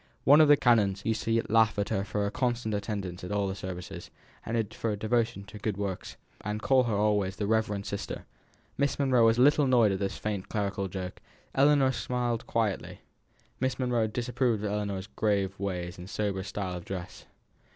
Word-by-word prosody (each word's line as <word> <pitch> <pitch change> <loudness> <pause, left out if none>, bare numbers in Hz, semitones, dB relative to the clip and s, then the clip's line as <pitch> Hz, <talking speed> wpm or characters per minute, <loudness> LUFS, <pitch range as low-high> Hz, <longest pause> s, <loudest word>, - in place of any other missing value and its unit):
One 145 +3 +7
of 155 - +6
the 145 0 +7
canons 105 -6 +3
used 110 0 0
to 115 0 +2
laugh 110 -1 +3
at 100 - -1
her 95 - 0
for 105 0 -2
her 100 - -1
constant 120 -3 -1
attendance 100 -4 -4
at 90 - -5
all 100 -1 +1
the 95 - -2
services, 90 -2 -7 0.3
and 110 -2 -2
for 115 - -2
her 105 - 0
devotion 110 0 0
to 105 +1 -11
good 105 -2 -2
works, 100 -2 -4 0.3
and 105 +1 -2
call 130 +2 +3
her 115 -3 0
always 100 -2 +1
the 105 - -2
reverend 105 -2 0
sister. 100 - -5 0.5
Miss 140 -1 +1
Monro 130 -4 +3
was 115 0 +5
a 125 - +5
little 145 +1 +5
annoyed 120 -5 +4
at 95 - -1
this 95 -1 -2
faint 105 -3 -4
clerical 100 -2 -1
joke; 95 -1 -6 0.3
Ellinor 140 -1 +4
smiled 120 -2 -2
quietly. 110 -5 -1 0.6
Miss 130 0 0
Monro 120 -3 +1
disapproved 120 -1 -1
of 105 - -1
Ellinor's 100 -2 -2
grave 100 -3 -1
ways 90 -2 -3
and 90 +2 -9
sober 105 0 -1
severe - - -3
style 100 -3 -4
of 85 - -8
dress. 90 -1 -7
105 Hz, 195 wpm, -29 LUFS, 100-120 Hz, 0.6 s, One